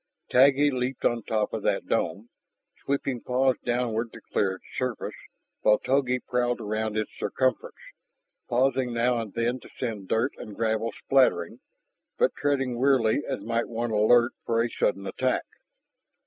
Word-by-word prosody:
Taggi 140 +3 +5
leaped 125 0 -3
to 120 - +3
the - - -8
top 110 -2 0
of - - -2
that - - 0
dome, - - -1 0.5
sweeping 135 -3 -1
paws 130 +1 +2
downward 120 -2 -1
to - - -11
clear 95 -2 +2
its - - -18
surface, 125 -3 -3 0.5
while 105 0 +5
Togi 130 -1 +1
prowled 120 -1 -1
around 110 0 -2
its 110 - -2
circumference, 130 -3 -1 0.7
pausing 125 0 +1
now 120 +1 +2
and 110 -3 -5
then 120 +2 0
to - - -15
send 110 -6 -4
dirt 115 +7 +1
and 105 - -9
gravel 115 0 0
spattering, 125 -11 +2 0.6
but - - +3
treading 135 -4 0
warily 130 -2 +3
as - - -3
might 115 +1 -1
one 120 0 -2
alert 120 +3 +4
for 115 0 +1
a 120 - -3
sudden 100 -1 0
attack. 130 +6 -1
120 Hz, 155 wpm, -26 LUFS, 110-130 Hz, 0.7 s, Taggi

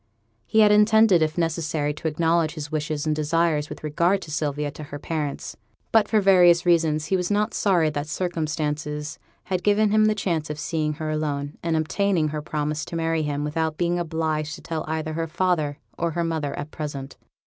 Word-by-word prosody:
He 220 - +4
had 210 -1 +6
intended 210 -3 +5
if 155 +1 0
necessary 160 -3 -1
to 155 +2 -4
acknowledge 165 +1 +1
his 150 -1 -6
wishes 155 -1 -2
and 155 -1 +1
desires 155 0 +1
with - - -9
regard 170 +6 +1
to 155 - -9
Sylvia 150 -1 -2
to 155 - -9
her 145 - -7
parents; 150 -1 -4 0.4
but 220 -3 +4
for 215 - +3
various 180 -3 +5
reasons 160 -3 +2
he 190 - 0
was 180 -1 -1
not 210 +1 +1
sorry 175 -6 +2
that 145 0 -3
circumstances 150 -3 -3 0.2
had 185 -2 -2
given 205 +2 +3
him 215 0 +4
the 215 0 +2
chance 170 -7 -1
of 150 - -4
seeing 155 0 -1
her 155 0 -4
alone, 145 -2 -3
and 165 -1 0
obtaining 165 0 +1
her 150 0 -4
promise 150 0 -2
to - - -7
marry 165 -1 0
him 145 -1 -2
without 155 +1 -1
being 175 0 0
obliged 155 -2 -2
to - - -12
tell 160 -1 -4
either 155 0 -3
her 165 +1 -2
father 165 -4 0 0.2
or 170 - +1
her 170 +1 -2
mother 160 -4 -2
at 145 +1 -6
present. 145 -3 -6
160 Hz, 195 wpm, -24 LUFS, 150-175 Hz, 0.4 s, had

